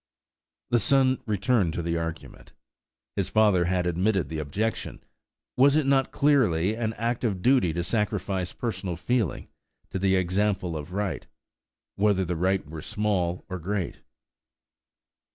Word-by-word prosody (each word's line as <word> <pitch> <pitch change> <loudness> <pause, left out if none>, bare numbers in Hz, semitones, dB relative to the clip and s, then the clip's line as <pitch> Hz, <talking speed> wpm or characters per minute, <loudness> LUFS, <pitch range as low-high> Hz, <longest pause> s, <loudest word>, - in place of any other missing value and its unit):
The 120 - +4
son 130 +2 +3
returned 105 -3 +1
to 85 - -3
the 85 0 -1
argument. 80 -1 -6 0.6
His - - -1
father 105 -5 +4
had 90 0 0
admitted 90 -1 +1
the 80 -1 -4
objection; 100 +10 -3 0.5
was 140 +3 +5
it 155 -2 +2
not 135 -1 +3
then - - -24
clearly 110 - +2
an 110 -1 -2
act 115 +3 -2
of 100 -6 -1
duty 125 -9 +4
to 85 +2 -2
sacrifice 100 -3 -1
personal 100 -7 -4
feeling 115 +2 -1 0.4
to 95 - -2
the 95 0 +2
example 95 -1 0
of 75 +2 -6
right–whether 100 +2 -3
the 90 +1 -2
right 95 +3 0
were 80 +1 -7
small 100 -4 -1
or 95 -1 -5
great? 95 +1 -3
95 Hz, 140 wpm, -26 LUFS, 85-110 Hz, 0.6 s, was